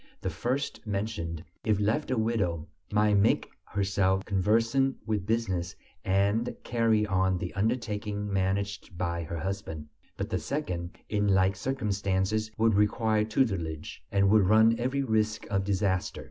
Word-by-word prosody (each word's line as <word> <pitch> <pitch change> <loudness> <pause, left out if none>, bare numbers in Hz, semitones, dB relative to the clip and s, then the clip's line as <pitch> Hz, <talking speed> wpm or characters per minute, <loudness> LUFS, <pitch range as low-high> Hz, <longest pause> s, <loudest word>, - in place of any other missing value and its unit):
The 95 - -3
first 125 - -3
mentioned, 100 -6 -3 0.2
if 105 -3 +2
left 110 +8 0
a 130 - 0
widow, 100 -8 0 0.2
might 105 0 +3
make 100 +3 +3 0.2
herself 95 -1 +1
conversant 115 +7 +2
with 105 -3 -2
business 95 -7 -1 0.3
and 100 +5 +1
carry 115 -3 +2
on 95 -2 +1
the 90 0 -5
undertaking 105 -1 -1
managed 95 -1 -1
by 85 -1 -1
her 85 +1 -5
husband; 80 -4 -4 0.3
but - - -2
the - - -1
second 90 - -4
in 105 -1 +1
like 95 0 +3
circumstances 105 -2 -1
would 115 0 +3
require 105 +1 +2
tutelage, 95 - -1
and 100 0 +3
would 105 -3 +5
run 110 +1 +6
every 130 +3 0
risk 110 -3 0
of 95 -1 +1
disaster. 95 -1 0
100 Hz, 140 wpm, -28 LUFS, 95-110 Hz, 0.3 s, run